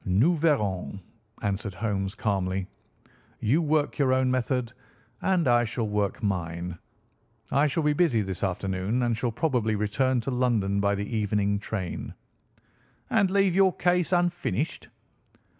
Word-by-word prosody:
"Nous 110 - +3
verrons," 105 - 0 0.4
answered 100 -1 -2
Holmes 100 -3 -2
calmly. 95 -2 -1 0.7
"You 130 +10 +2
work 155 -1 0
your 130 -2 +3
own 130 0 +2
method, 125 -1 -1 0.5
and 185 -5 +2
I 120 -1 +4
shall 115 0 -2
work 105 0 -1
mine. 85 -3 -3 0.7
I 140 +3 +3
shall 155 +3 -1
be 150 0 +3
busy 145 -9 +2
this 95 0 -4
afternoon, 95 +5 -1
and 120 -1 +1
shall 120 +2 -1
probably 120 -4 0
return 125 +5 +1
to 135 - -3
London 115 -6 +1
by 100 0 +2
the 100 +1 -3
evening 100 -1 +1
train." 100 -4 -5 1.0
"And 195 - +3
leave 195 -1 +3
your 190 0 +4
case 180 0 +1
unfinished?" 175 - 0
115 Hz, 140 wpm, -27 LUFS, 100-145 Hz, 1.0 s, I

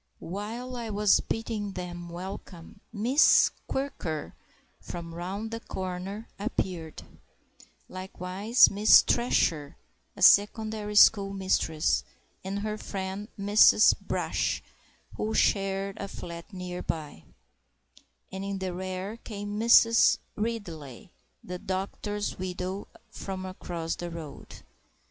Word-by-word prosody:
While 225 - -6
I 230 -2 -5
was 210 -1 +4
bidding 220 -3 -3
them 175 -1 -6
welcome, 180 0 -9
Miss 240 +7 +5 0.2
Quirker 225 - -3 0.5
(from 165 -1 -7
round 195 +6 -5
the 230 - -4
corner) 190 +2 -5
appeared; 185 -7 -3 0.8
likewise 185 +4 +2
Miss 210 +2 +7
Thresher 165 - +1 0.4
(a - - -3
secondary 210 0 +4
school 200 -1 +6
mistress) 185 -5 +1 0.4
and 195 +2 -3
her 215 0 -3
friend 195 +1 -5
Mrs. 205 +1 +6
Brash, - - -1 0.5
who 220 +1 -2
share 195 0 +1
a 200 - -5
flat 170 0 -8
near 180 -2 -6
by; 150 - -5 1.1
and 190 0 -5
in 200 0 -3
the 190 -1 -3
rear 185 +3 -5
came 205 -2 -6
Mrs. 230 0 +6 0.2
Ridley, 180 - -5 0.3
the 180 0 -6
doctor's 200 +2 -3
widow 185 +1 -4 0.2
from 190 -1 -6
across 175 -3 -4
the 175 - -6
road. 160 -4 -9
195 Hz, 110 wpm, -28 LUFS, 180-210 Hz, 1.1 s, Miss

